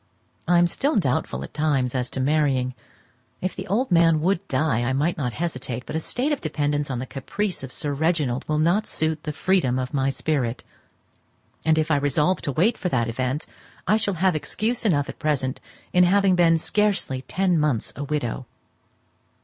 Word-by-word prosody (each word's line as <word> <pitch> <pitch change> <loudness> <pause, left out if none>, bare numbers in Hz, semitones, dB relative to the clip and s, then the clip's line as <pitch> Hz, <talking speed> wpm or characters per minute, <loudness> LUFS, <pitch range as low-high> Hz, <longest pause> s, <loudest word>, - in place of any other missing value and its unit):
I 175 0 +4
am 175 - +5
still 275 - 0
doubtful 140 - 0
at - - -9
times 145 -5 +1
as 125 -1 -1
to - - -5
marrying; 135 -2 +1 0.7
if 185 - -3
the - - -6
old 230 +6 0
man 165 -2 +5
would 195 +3 0
die 130 -3 +1
I 120 +2 0
might 150 +6 +1
not 125 -5 -2
hesitate, 130 -7 -3
but - - -6
a - - +1
state 250 - -1
of 290 - -1
dependance 145 -2 -1
on 130 - -2
the 125 - -4
caprice 180 +10 -3
of 130 -1 -7
Sir 145 +2 -2
Reginald 150 -4 0
will 155 - 0
not 170 +7 +2
suit 155 -1 -1
the 150 - -1
freedom 160 -6 +1
of 130 -1 -3
my 135 -1 +1
spirit; 135 -3 -1 1.0
and 160 -1 +3
if 155 0 +1
I 145 - +4
resolve 150 +6 +1
to 140 - -2
wait 180 - +2
for 180 - -1
that 120 -5 0
event, 130 +5 -2 0.4
I 210 - +3
shall 205 -3 0
have 185 0 +2
excuse 225 +10 -1
enough 145 -9 +2
at - - -8
present 135 -4 -1 0.3
in 180 0 +6
having 195 0 +4
been 165 -2 +4
scarcely 195 -7 0
ten 180 +5 +1
months 150 -7 0
a 145 - -4
widow. 135 -4 -3
155 Hz, 190 wpm, -24 LUFS, 130-180 Hz, 1.0 s, in